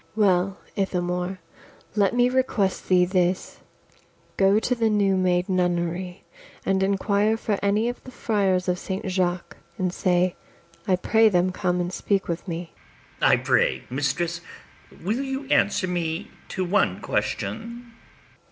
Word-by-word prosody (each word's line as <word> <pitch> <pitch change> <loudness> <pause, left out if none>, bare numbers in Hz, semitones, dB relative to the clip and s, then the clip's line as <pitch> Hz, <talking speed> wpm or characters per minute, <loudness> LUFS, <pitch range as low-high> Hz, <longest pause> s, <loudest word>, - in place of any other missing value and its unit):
ABIGAIL. - - -33
Well, 185 +1 +1 0.2
Ithamore, 180 -1 -1 0.6
let 205 +2 +2
me 245 0 +4
request 250 -7 0
thee 180 -1 +5
this; 180 0 0 0.8
Go 195 +1 +4
to 250 - 0
the 230 -2 +1
new 200 -2 +2
made 180 -1 +1
nunnery, 180 -1 -1 0.4
and 195 0 +1
inquire 200 +2 +2
For 210 -3 -1
any 205 +3 +2
of 245 - -5
the - - -10
friars 195 -7 0
of 180 0 0
Saint 190 +3 -4
Jaques, 180 -2 -1 0.2
And 185 -3 -1
say, 180 -1 +1 0.5
I 185 - +4
pray 220 +4 +4
them 180 -1 +2
come 180 -1 -1
and 175 +1 -2
speak 195 +1 0
with 170 +3 -4
me. 170 0 -5 0.5
ITHAMORE. - - +4
I - - +5
pray, - - +2
mistress, 170 +6 -1 0.6
will 215 +8 0
you 270 0 -4
answer 200 -6 +2
me 175 +1 -3 0.2
to 185 - -2
one 195 +4 +1
question? 235 +1 -3
190 Hz, 145 wpm, -24 LUFS, 180-210 Hz, 0.8 s, thee